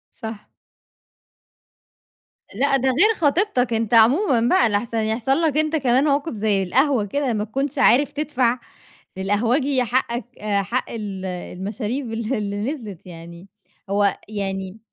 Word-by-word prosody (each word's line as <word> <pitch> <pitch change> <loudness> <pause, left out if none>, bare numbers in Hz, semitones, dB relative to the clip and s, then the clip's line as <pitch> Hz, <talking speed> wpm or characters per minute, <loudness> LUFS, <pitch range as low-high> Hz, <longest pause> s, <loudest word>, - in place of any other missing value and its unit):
صح. 220 -2 -8 2.1
لأ، 275 +4 +2
ده 265 0 +1
غير 365 - +4
خطيبتك، 290 - +1
أنت 225 0 -1
عمومًا 250 - +5
بقى 240 -1 +4
لاحسن 220 +3 -1
يحصل 225 +4 -1
لك 310 -3 +1
أنت 310 +1 +1
كمان 260 -3 +2
موقف 295 +1 0
زي 205 -2 0
القهوة 255 +4 +2
كده 265 +4 -1
ما 210 -1 -1
تكونش 270 +7 -3
عارف 275 +1 +4
تدفع 255 -5 0 0.6
للقهوجي 245 +8 +1
حقك 240 0 -1 0.2
حق 210 +4 -1
ال 200 -4 -6
المشاريب 210 +7 -5
اللي 225 +2 -2
اللي 205 +3 -3
نزلِت 205 - -9
يعني. 170 +1 -11 0.4
هو 200 0 +2
يعني 195 -1 -4
230 Hz, 130 wpm, -22 LUFS, 205-270 Hz, 2.1 s, عمومًا